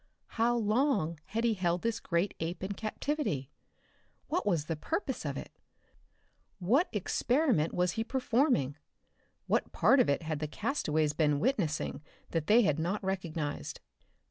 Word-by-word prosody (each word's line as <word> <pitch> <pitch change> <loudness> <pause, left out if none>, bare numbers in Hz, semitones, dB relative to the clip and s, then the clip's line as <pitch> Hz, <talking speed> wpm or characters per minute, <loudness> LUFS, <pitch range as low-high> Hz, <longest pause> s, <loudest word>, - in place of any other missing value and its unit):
How 235 +1 +2
long 210 - +1
had 225 +3 -2
he 235 -1 +3
held 175 -3 0
this 230 0 0
great 175 0 0
ape 170 +3 -3
in 190 - -2
captivity? 215 - -2 0.8
What 345 - 0
was 165 -7 +1
the 165 - -2
purpose 320 - -3
of - - -2
it? - - -7 1.1
What 240 - +2
experiment 235 - +1
was 180 0 +1
he 225 - -2
performing? 245 - +1 0.7
What - - 0
part 270 - +4
of 250 - +4
it 140 +4 +1
had 155 -2 -2
the 155 - -2
castaways 155 - 0
been 150 -2 +2
witnessing 185 - 0 0.3
that 165 -2 -1
they 235 +3 +6
had 155 -5 +2
not 185 +6 -1
recognized? 165 -6 -3
190 Hz, 145 wpm, -31 LUFS, 155-235 Hz, 1.1 s, they